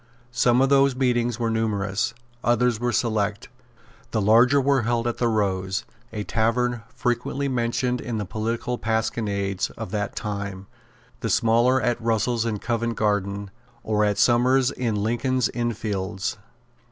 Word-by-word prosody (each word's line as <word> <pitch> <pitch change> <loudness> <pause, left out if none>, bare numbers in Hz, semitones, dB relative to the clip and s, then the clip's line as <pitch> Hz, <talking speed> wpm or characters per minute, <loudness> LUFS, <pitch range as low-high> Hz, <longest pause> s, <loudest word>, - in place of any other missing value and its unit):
Some 120 +1 +3
of 135 - +2
those 140 -1 +4
meetings 120 -3 +1
were 115 -2 -1
numerous; 105 -1 -1 0.3
others 120 -1 +2
were 120 0 0
select. 105 -4 -1 0.6
The 110 - -1
larger 115 +7 +5
were 140 -1 +2
held 120 +1 0
at 120 - -2
the 120 - +2
Rose, 95 -3 0 0.3
a 105 -2 -4
tavern 115 +2 0
frequently 125 +4 -2
mentioned 125 0 0
in 115 -2 -3
the 105 - -2
political 115 +5 -3
pasquinades 105 -4 -1
of - - -6
that 105 -1 -2
time; 100 -2 -4 0.5
the - - -3
smaller 120 +3 +3
at 120 0 0
Russell's 115 +1 0
in 110 -2 -1
Covent 115 +1 -2
Garden, 100 -1 -1 0.3
or 105 -1 +1
at 105 -1 +1
Somers's 125 +4 +4
in 120 -6 -2
Lincoln's 120 +4 0
Inn 120 -1 -1
Fields. 100 -1 -3
115 Hz, 145 wpm, -24 LUFS, 105-120 Hz, 0.6 s, larger